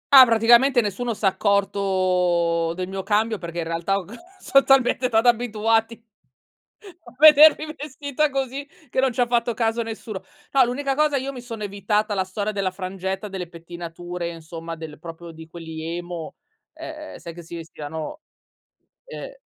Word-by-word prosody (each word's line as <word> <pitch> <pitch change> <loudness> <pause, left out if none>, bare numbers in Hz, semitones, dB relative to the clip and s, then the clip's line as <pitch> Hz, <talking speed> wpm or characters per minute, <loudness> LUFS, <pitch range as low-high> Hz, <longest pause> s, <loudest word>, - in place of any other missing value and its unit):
Ah, 260 -1 +12
praticamente 235 +3 +5
nessuno 225 +3 -3
s'è 210 - -4
accorto 185 -4 +1
del 185 0 -4
mio 190 0 -4
cambio 215 +2 0
perché, 170 -1 -7
in - - -1
realtà, 165 +4 -1
ho 195 - -5
c 205 - -12 0.3
son 275 0 +4
talmente 260 -1 +3
stati 225 0 +2
abituati 225 -1 +1 1.0
a - - -15
vedermi 310 +1 +7
vestita 285 0 -2
così, 270 +1 -3 0.2
che 260 - -1
non 265 0 +3
ci 250 - 0
ha 245 - +3
fatto 235 0 +1
caso 225 +1 0
nessuno. 220 -3 -7 0.3
No, 265 -2 +6
l'unica 270 +2 -2
cosa 300 -1 +2
io 270 +1 -3
mi 255 - -8
sono 230 -3 -8
evitata 205 +1 -1
la 190 - +1
storia 200 +3 -3
della 195 -2 -1
frangetta, 190 +1 -4
delle 190 -3 -5
pettinature, 175 +1 -7
insomma 165 0 -8
del 160 -2 -9
proprio 165 +1 -9
di 160 0 -12
quelli 160 -1 -8
emo, 175 -2 -6 0.4
uhm, 310 -1 -9
sai 170 - -9
che 175 - -10
si 170 +1 -9
vestivano 160 - -7 0.9
uhm - - -9
205 Hz, 165 wpm, -23 LUFS, 175-245 Hz, 1.0 s, Ah